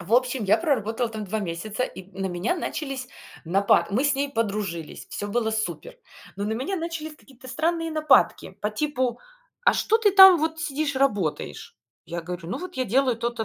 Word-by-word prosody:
В 185 +6 0
общем, 250 -2 +2
я 195 - +4
проработала 240 - 0
там 220 -2 -6
2 220 +3 -2
месяца, 205 +5 -3
и 190 - -8
н 195 +1 -9
на - - 0
меня 185 - -1
начались 275 -6 -4 0.4
напа 195 +4 +3
мы 235 +7 +1
с 285 - +3
ней 280 +1 -1
подружились. 200 - -3
Всё 205 - -4
было 220 +1 0
супер. 220 - -4 0.4
Но 200 - -3
на 215 - -1
меня 275 - -2
начались 325 -2 -5
какие-то 260 -3 -17
странные 330 +4 -1
нападки. 310 -2 +3
По 210 - -1
типу: 255 -1 -1 0.4
"А - - +6
что 445 +1 +2
ты 420 -3 +4
там 385 -2 +9
вот 320 +1 -1
сидишь 285 -3 -2
работаешь?" 205 - -1 0.3
Я 170 0 -5
говорю: 175 0 -7
"Ну - - -3
вот 365 0 -8
я 255 - 0
делаю 250 +2 +2
то-то, 235 -1 -2
245 Hz, 190 wpm, -25 LUFS, 205-305 Hz, 0.4 s, там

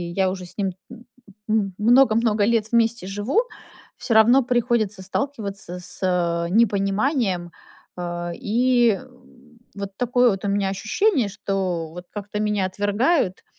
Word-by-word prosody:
я 190 -1 +2
уже 185 -1 -5
с 175 - -13
ним, 195 -2 0 0.2
э, - - -8 0.5
м 205 -3 +1
много 240 +2 +5
много 220 -3 +2
лет 220 -1 +1
вместе 235 -3 +1
живу, 205 - 0 0.6
всё 230 - -2
равно 240 +5 +6
приходится 235 -5 0
сталкиваться 200 -6 -4
с, 180 - -6
э, 170 -2 0
непониманием. 200 - +1 0.5
Э, 175 -1 -4
и 240 -1 +2 0.8
вот 200 -1 -6
такое 245 0 +3
вот 195 +1 -4
у - - 0
меня 200 -1 0
ощущение, 235 - +1
что 190 -5 -3
вот 180 +1 -9
как-то 210 0 -5
меня 210 -2 0
отвергают 205 - 0
205 Hz, 135 wpm, -22 LUFS, 190-235 Hz, 0.8 s, равно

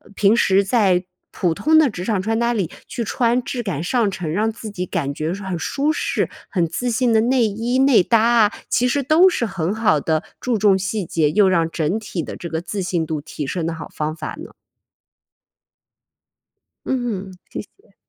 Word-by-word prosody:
平 205 +2 +4
时 195 -3 +3
在 190 -4 +2 0.3
普 175 -3 0
通 310 - +3
的 310 -3 +5
职 180 -5 -6
场 210 -5 0
穿 225 +3 -1
搭 235 0 +1
里 195 -7 -1 0.2
去 235 - -4
穿 240 +3 +1
质 245 0 -3
感 170 -7 -3
上 225 +2 +1
乘， 170 -5 -4
让 215 +5 +1
自 220 -1 -8
己 180 -2 -4
感 145 -7 -2
觉 155 +4 -2
很 190 -3 -4
舒 285 - 0
适， - - -1 0.2
很 175 -5 +1
自 245 +9 -2
信 235 +1 +1
的 220 - +5
内 245 0 +3
衣 230 +5 -1
内 270 -5 +5
搭 230 +2 +3
啊， 230 -3 +4 0.2
其 250 - +2
实 280 +2 0
都 330 +7 +5
是 240 - -1
很 190 -2 -2
好 210 -9 +2
的 160 +2 0 0.2
注 245 -3 0
重 200 -2 +4
细 195 0 -2
节， 155 -2 +1
又 205 +1 +4
让 165 -3 +2
整 165 +6 -1
体 185 -6 -4
的 - - -7
这 170 - -6
个 160 +1 -2
自 195 +2 -4
信 175 -3 -1
度 155 -1 -3
提 150 -1 -6
升 170 0 -2
的 165 - -2
好 160 - -8
方 155 +1 -3
法 - - -6
呢。 - - -9 2.4
嗯， 225 -7 -2 0.2
谢 - - -5
谢。 415 +5 -22
200 Hz, 215 characters per minute, -21 LUFS, 175-235 Hz, 2.4 s, 的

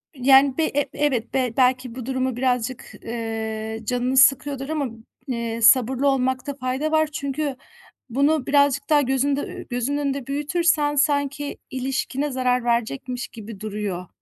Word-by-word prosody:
yani, 270 +2 +5
b 320 - +2
e 290 -1 -1
evet, 260 -6 -1
be 255 -3 0
belki 255 -1 +2
bu 250 -3 -6
durumu 260 -2 -1
birazcık, 250 -1 -2
eee, 220 -1 -4
canını 250 +3 -1
sıkıyordur 270 +1 +4
ama, 305 -3 -1 0.4
eee, 230 -2 -3
sabırlı 255 +3 +5
olmakta 260 +1 0
fayda 265 +3 -2
var 315 -1 +3
çünkü 280 -1 -2 0.5
bunu 280 +3 +2
birazcık 285 0 +2
daha 295 -1 +5
gözünde 275 +2 +1
ü - - -8
gözünün 250 +3 -1
önünde 280 -3 -2
büyütürsen 295 0 +1
sanki 285 -1 0
ilişkine 270 +2 -2
zarar 250 -1 +1
verecekmiş 240 - -1
gibi 220 -3 -10
duruyor. 205 -4 -4
260 Hz, 140 wpm, -23 LUFS, 245-285 Hz, 0.5 s, yani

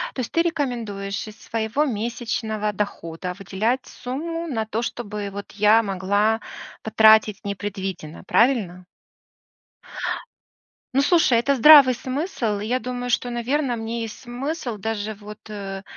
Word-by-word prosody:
То - - -3
есть 240 - -3
ты 335 - +3
рекомендуешь 230 -12 -3
из 215 0 -12
своего 225 +5 -1
месячного 220 -3 -2
дохода 180 -3 -4
выделять 215 +7 -1
сумму 330 +7 -5
на 235 -8 -2
то, 220 +1 -3
чтобы 210 -4 -4
вот 200 +1 -7
я 210 +2 +5
могла 205 +2 +1 0.4
потратить 220 -1 +5
непредвиденно, 195 -5 -5
правильно? 195 -5 +1 2.1
Ну, 265 - +3
слушай, 290 -6 +4
это 275 +4 +2
здравый 280 -1 +9
смысл. 255 - -2
И 210 - -4
я 250 +3 +1
думаю, 245 +1 -4
что, 245 0 +1
наверно, 245 +2 -1
мне 230 +1 -4
есть 225 -1 -7
смысл 255 0 -4
даже 220 +1 -3
вот, 210 +1 -11
э, 195 -2 -6
225 Hz, 130 wpm, -23 LUFS, 205-250 Hz, 2.1 s, здравый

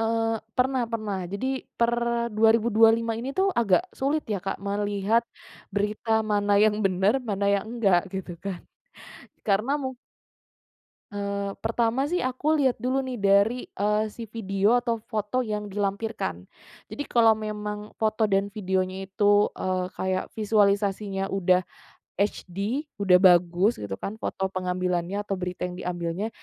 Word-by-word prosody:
Eee. 225 0 0 0.2
Pernah 260 0 +2
pernah. 215 -4 -2
Jadi 200 +6 -2 0.3
per 235 0 +3 0.4
2025 225 +1 +4
ini 250 +4 -4
tuh 390 +1 +4
agak 230 - +3
sulit 290 +3 0
ya, 210 -2 -1
Kak, 195 - -3
melihat 205 +2 +1 0.5
berita 215 +2 0
mana 205 -1 +1
yang 210 0 +4
bener, 195 +6 +2
mana 200 -3 -1
yang 195 - -1
enggak, 195 -6 +4
gitu 190 -2 -5
kan. 195 -3 -4 0.9
Karena 215 +7 +2
mung 260 0 -3 1.2
Eee, 200 -1 -3
pertama 230 +3 +1
sih 355 +5 -1
aku 260 +4 0
lihat 270 -5 +2
dulu 260 +2 0
nih 260 -2 -5
dari, 200 +4 +3
eee, 210 +2 0
si 230 -2 -8
video 205 +1 +1
atau 235 -2 -1
foto 215 +2 -2
yang 210 -3 -3
dilampirkan. 205 +2 -3 0.4
Jadi 290 - -5
kalau 225 -2 +5
memang 210 -1 -5
foto 215 0 +1
dan 195 0 +1
videonya 190 -1 -2
itu, 205 +1 +3
eee, 185 -1 -1
kayak 185 0 -1
visualisasinya 200 -2 +1
udah 185 -1 +2 0.6
HD, 200 - -2 0.2
udah 190 -3 +6
bagus, 180 +3 +4
gitu 100 -2 -4
kan, 215 +2 -6
foto 190 - -2
pengambilannya 180 +1 -1
atau 200 - -2
berita 180 -1 -4
yang 180 0 -7
diambilnya, 175 +3 -3
205 Hz, 140 wpm, -26 LUFS, 195-225 Hz, 1.2 s, udah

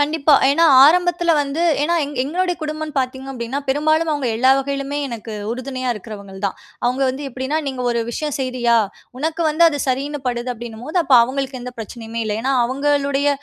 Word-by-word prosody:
கண்டிப்பா, 295 0 +3 0.2
ஏன்னா 330 +4 +3 0.2
ஆரம்பத்துல 345 +2 +3
வந்து, 285 +2 -2 0.2
ஏன்னா 335 +3 +1
எங் 290 +1 -7
எங்களுடைய 355 +6 -1
குடும்பம்ன்னு 310 0 -4
பாத்தீங்க 265 +1 -3
அப்படீன்னா, 245 +1 -4
பெரும்பாலும் 310 +4 +2
அவங்க 290 -3 -2
எல்லா 260 +3 +4
வகையிலுமே 275 +1 -3
எனக்கு 230 -2 -7 0.2
உறுதுணையா 255 +1 -4
இருக்குறவங்கள்தான். 200 -2 -6 0.3
அவங்க 250 +3 +1
வந்து 265 +3 -4
எப்படீன்னா, 260 +4 -2
நீங்க 260 -2 -3
ஒரு 235 -1 0
விஷயம் 295 +4 -3
செய்றியா, 250 -3 +1 0.4
"உனக்கு 320 +4 -1
வந்து 310 +2 +1
அது 290 -3 -3
சரின்னு 275 +3 -1
படுது." 245 0 -2
அப்படீன்னும்போது, 240 +6 -7
அப்ப 275 -4 +3
அவங்களுக்கு 265 +1 -4
எந்த 250 +1 -7
பிரச்சனையுமே 225 +1 -6
இல்ல. 210 -1 -2
ஏன்னா, 265 +2 +1
அவங்களுடைய 280 +2 +1
270 Hz, 165 wpm, -20 LUFS, 245-295 Hz, 0.4 s, எல்லா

